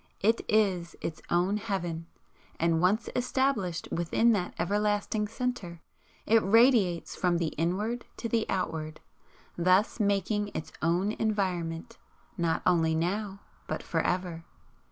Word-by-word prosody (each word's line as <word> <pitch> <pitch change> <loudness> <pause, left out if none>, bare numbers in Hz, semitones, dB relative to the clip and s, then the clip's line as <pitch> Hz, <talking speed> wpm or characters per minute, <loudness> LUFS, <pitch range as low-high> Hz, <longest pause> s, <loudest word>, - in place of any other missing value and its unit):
It 225 +3 +3
is 190 -5 +2
its 155 - -5
own 180 +4 +2
Heaven, 175 -6 -3 0.5
and 165 0 +2
once 200 +6 +2
established 245 -9 0
within 175 +7 +2
that 190 -5 -1
everlasting 210 +2 0
centre, 225 -7 -4 0.5
it 225 +1 +5
radiates 215 -5 +3
from 180 -2 +1
the 165 -2 0
Inward 205 +10 -2
to 230 - -3
the 230 -1 0
Outward, 155 -4 -2 0.6
thus 185 +6 +3
making 205 0 +1
its 155 - -5
own 175 +5 +1
environment, 195 -2 -2 0.4
not 170 -3 0
only 165 -3 +3
now 195 +4 -2 0.3
but - - -3
for - - 0
ever. 175 -2 -2
190 Hz, 125 wpm, -29 LUFS, 170-215 Hz, 0.6 s, it